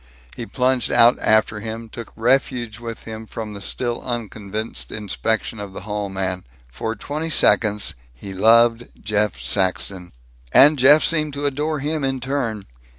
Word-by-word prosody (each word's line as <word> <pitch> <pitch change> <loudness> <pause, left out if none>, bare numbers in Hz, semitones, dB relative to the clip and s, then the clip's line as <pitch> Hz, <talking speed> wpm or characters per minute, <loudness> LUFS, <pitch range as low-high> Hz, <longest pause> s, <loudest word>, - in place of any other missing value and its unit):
He 115 - -6
plunged 125 +3 0
out 120 +2 +5
after 110 0 +2
him, 115 +1 -6
took 115 +1 -9
refuge 120 -2 0
with 115 -1 -7
him 110 0 -8
from 110 -1 -6
the 100 - -8
still 120 +4 -3
unconvinced 110 -3 -5
inspection 110 +1 -2
of 100 -2 -7
the - - -7
hall 105 0 -4
man. 95 -1 -3 0.3
For 110 - -4
twenty 155 +6 -4
seconds, 105 -8 +3 0.2
he 60 +11 -9
loved 115 +4 +4
Jeff 105 0 -1
Saxton. 95 -1 -1 0.4
And 145 - +6
Jeff 145 +4 +7
seemed 155 -3 0
to 145 +1 -4
adore 145 +2 -1
him 150 +1 -2
in 135 -1 -1
turn. 125 -6 -3
115 Hz, 150 wpm, -21 LUFS, 105-130 Hz, 0.4 s, Jeff